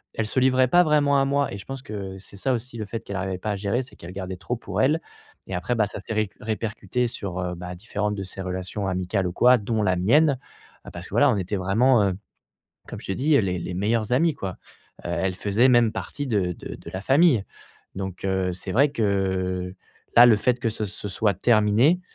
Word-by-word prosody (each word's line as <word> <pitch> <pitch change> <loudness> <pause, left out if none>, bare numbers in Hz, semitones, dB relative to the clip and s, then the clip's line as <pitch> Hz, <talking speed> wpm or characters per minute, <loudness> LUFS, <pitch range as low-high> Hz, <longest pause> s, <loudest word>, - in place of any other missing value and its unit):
elle 115 - -1
se 130 - +1
livrait 130 0 +4
pas 175 +7 +5
vraiment 145 -3 +3
à - - +2
moi 140 -2 0
et - - -5
je 100 - -11
pense 135 -1 -7
que 100 -5 -6
c'est 100 +1 -13
ça 130 +6 0
aussi 120 +1 -4
le 110 - -4
fait 115 +2 -5
qu'elle 100 -3 -6
arrivait 95 -1 -3
pas 105 +3 -2
à 105 - -1
gérer. 105 +6 -1
C'est 130 - -13
qu'elle 85 - -10
gardait 95 -1 -5
trop 125 +7 -3
pour 100 -2 -3
elle 150 +5 +3 0.5
et - - -6
après, 105 +7 -1
bah, 110 -2 +2
ça 105 - -7
s'est 105 - -6
réc 110 -3 0
répercuté 115 +3 -2
sur, 100 -5 -5
heu, 90 -1 -3
bah 90 +1 -7
différentes 105 +2 -3
de 100 - -4
ces 95 +1 -7
relations 95 +2 -3
amicales 95 +1 -1
ou 90 - -3
quoi, 125 +6 +5
dont 110 +1 -1
la 95 -2 +2
mienne, 135 - +3 0.5
heu, - - -5
parce - - -8
que - - -18
voilà, - - +5
on - - 0
était 95 +2 -2
vraiment, 110 +5 +3
heu, 95 -1 +1 0.8
comme - - -7
je - - -10
t'ai 95 - -1
dit, 150 +4 +2
heu, - - +5
les 90 -3 -1
les 85 +1 -5
meilleurs 110 +4 0
amis 160 +4 +3
quoi. 100 -9 -4 0.5
Heu, - - -4
elle 95 +1 -1
faisait 105 +7 +2
même 120 -3 +5
partie 140 +5 -5
de 100 -6 +1
de - - -8
de - - -11
la 95 - -4
famille 135 - +4 0.5
donc, 95 -1 -5
heu, 95 -1 0
c'est 90 +2 -6
vrai 140 +7 +4
que 95 -5 -1 0.4
là, 120 +1 +10
le 115 -3 +6
fait 125 +3 +1
que, 115 - 0
ce 110 0 -2
ce 105 +1 -4
soit 100 +1 +1
terminé, 115 - +3
105 Hz, 240 wpm, -24 LUFS, 95-125 Hz, 0.8 s, là